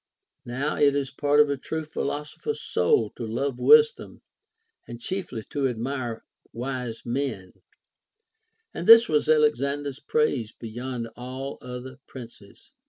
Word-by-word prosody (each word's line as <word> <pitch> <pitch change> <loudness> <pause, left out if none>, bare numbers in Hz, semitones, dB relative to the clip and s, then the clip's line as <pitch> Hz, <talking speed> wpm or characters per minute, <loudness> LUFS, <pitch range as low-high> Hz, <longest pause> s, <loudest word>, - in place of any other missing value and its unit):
Now 135 +5 -2
it 140 -1 +4
is 140 -2 -1
part 145 +2 +2
of 150 - +7
a 140 - -1
true 160 +4 -4
philosopher's 150 - -4
soul 445 -3 +1
to - - -8
love 120 +4 -2
wisdom 455 +1 +4 0.6
and 120 0 -8
chiefly 180 - -5
to 140 -2 0
admire 120 -1 -4 0.3
wise 125 -1 -5
men; 120 -7 -3 1.2
and 170 - -5
this 230 +1 +9
was 150 -1 +1
Alexander's 145 -2 +1
praise 140 -6 0
beyond 120 +1 -6
all 130 +3 -6
other 125 +1 -8
princes. 115 -5 -13
135 Hz, 125 wpm, -25 LUFS, 120-150 Hz, 1.2 s, this